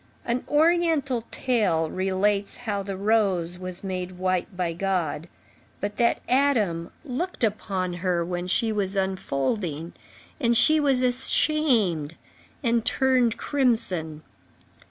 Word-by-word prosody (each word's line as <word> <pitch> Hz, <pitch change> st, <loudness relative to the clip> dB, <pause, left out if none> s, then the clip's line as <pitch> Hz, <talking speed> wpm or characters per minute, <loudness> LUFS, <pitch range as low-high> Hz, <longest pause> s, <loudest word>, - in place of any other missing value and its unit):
An 245 Hz, +1 st, -1 dB
oriental 305 Hz, -6 st, +2 dB
tale 200 Hz, -11 st, +1 dB
relates 195 Hz, +2 st, 0 dB
how 205 Hz, -3 st, -1 dB
the 195 Hz, -1 st, -5 dB
rose 195 Hz, -5 st, +1 dB
was 185 Hz, 0 st, -7 dB
made 185 Hz, -1 st, -4 dB
white 185 Hz, +1 st, -2 dB
by 175 Hz, -2 st, -1 dB
God, 175 Hz, -3 st, -2 dB, 0.5 s
but 205 Hz, +1 st, -4 dB
that 235 Hz, -1 st, +1 dB
Adam 225 Hz, -11 st, +1 dB, 0.2 s
looked 305 Hz, +4 st, -4 dB
upon 195 Hz, -4 st, -1 dB
her 180 Hz, -2 st, 0 dB
when 175 Hz, 0 st, -4 dB
she 220 Hz, +4 st, +1 dB
was 200 Hz, -2 st, -1 dB
unfolding, 175 Hz, -, -2 dB, 0.5 s
and 235 Hz, -4 st, +3 dB
she 310 Hz, +5 st, +6 dB
was 270 Hz, -3 st, +2 dB
ashamed 245 Hz, -, +2 dB, 0.5 s
and 235 Hz, -2 st, +2 dB
turned 255 Hz, -3 st, +2 dB
crimson. 195 Hz, -, 0 dB
200 Hz, 115 wpm, -25 LUFS, 180-245 Hz, 0.5 s, she